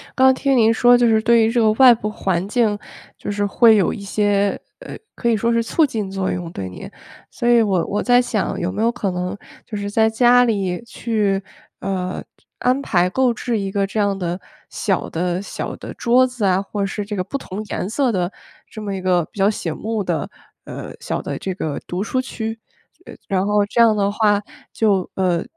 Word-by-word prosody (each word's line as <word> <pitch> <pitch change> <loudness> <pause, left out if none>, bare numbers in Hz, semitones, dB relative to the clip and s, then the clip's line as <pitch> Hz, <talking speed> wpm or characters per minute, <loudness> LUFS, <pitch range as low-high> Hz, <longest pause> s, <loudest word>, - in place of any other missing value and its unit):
刚 260 0 +5
听 270 0 +1
您 225 -1 +5
说 245 +2 +5
就 245 - +3
是 220 -1 +3
对 235 0 +4
于 225 - +2
这 240 - +1
个 215 -1 +4
外 255 +1 +7
部 215 -2 -3
环 190 -4 -1
境 215 -2 +1 0.4
就 - - -7
是 205 0 -1
会 225 +2 +5
有 195 -5 +2
一 - - -7
些， 200 0 0 0.2
呃， - - -9 0.2
可 235 - -1
以 230 - +3
说 230 +3 0
是 230 0 +2
促 305 +7 +2
进 215 -8 -3
作 195 -1 -2
用 175 -2 -4
对 95 -1 -5
您， 90 - -9 0.4
所 240 - -2
以 235 -1 +6
我 190 -5 +1
我 205 - -1
在 245 0 +4
想 215 -5 -2
有 175 +2 -2
没 205 +3 -3
有 230 - +3
可 215 -6 -2
能 180 +3 -3 0.3
就 210 - -6
是 205 0 -4
在 220 +1 +3
家 245 +2 +5
里 195 -5 -1
去， 215 -4 -1 0.4
呃， 185 -1 -3 0.2
就 - - -33
安 255 +3 +1
排 180 -7 +1
购 255 +3 +2
置 230 -2 -2
一 195 - -3
个 200 0 0
这 205 +2 -4
样 200 -1 +1
的 175 0 -3 0.3
小 195 -3 -1
的 175 +2 -2
小 200 - -5
的 - - -9
桌 250 +2 +4
子 250 -5 -3
啊， 190 0 +3
或 200 +1 -5
者 - - +1
是 205 +1 -3
这 210 +1 -5
个 185 - -1
不 240 +9 -4
同 205 -5 -7
颜 195 - -4
色 255 +1 +1
的 180 -1 -1 0.4
这 215 - -9
么 200 -2 -4
一 190 - -5
个 180 -2 +2
比 - - -22
较 195 +1 +4
醒 170 -6 -3
目 220 0 -3
的， 175 +2 -2 0.3
呃， - - -8
小 - - -3
的 - - -4
这 190 - -4
个 155 -5 -4
读 180 +2 -4
书 255 +4 -1
区？ 225 -3 -5 0.5
呃， - - -10
然 195 -1 0
后 205 0 +2
这 235 +3 +1
样 225 -2 +6
的 200 -1 +2
话， 205 -1 +2 0.3
就， 200 -5 +1
呃， 180 -3 +1
205 Hz, 240 characters per minute, -20 LUFS, 190-230 Hz, 0.5 s, 外